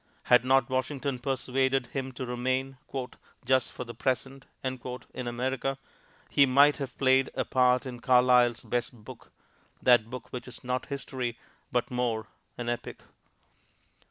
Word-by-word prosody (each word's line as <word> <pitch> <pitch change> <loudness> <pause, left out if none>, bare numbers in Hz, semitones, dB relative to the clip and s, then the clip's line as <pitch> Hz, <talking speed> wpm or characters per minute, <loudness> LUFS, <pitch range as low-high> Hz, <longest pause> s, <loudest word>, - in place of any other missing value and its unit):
Had 125 -1 +5
not 130 -1 +4
Washington 130 0 -2
persuaded 130 0 0
him 135 -1 -3
to 130 +1 -5
remain 130 +2 -1 0.7
"just 130 0 +2
for - - -6
the 120 -1 -8
present" 135 +3 -2 0.2
in 125 -1 -5
America, 130 +2 -2 0.5
he 140 -1 +5
might 140 +3 +5
have 135 -4 -6
played 130 0 +4
a - - 0
part 125 0 +3
in 125 -2 -6
Carlyle's 125 -1 +4
best 120 0 -2
book, - - -12 0.5
that 120 -3 +4
book 125 +1 -8
which 125 -1 -5
is 125 - -9
not 125 0 -2
history, 130 -4 -4 0.3
but 125 0 0
more 120 -3 -1 0.3
an 120 - -4
epic. 120 0 -4
125 Hz, 140 wpm, -29 LUFS, 125-135 Hz, 0.7 s, Had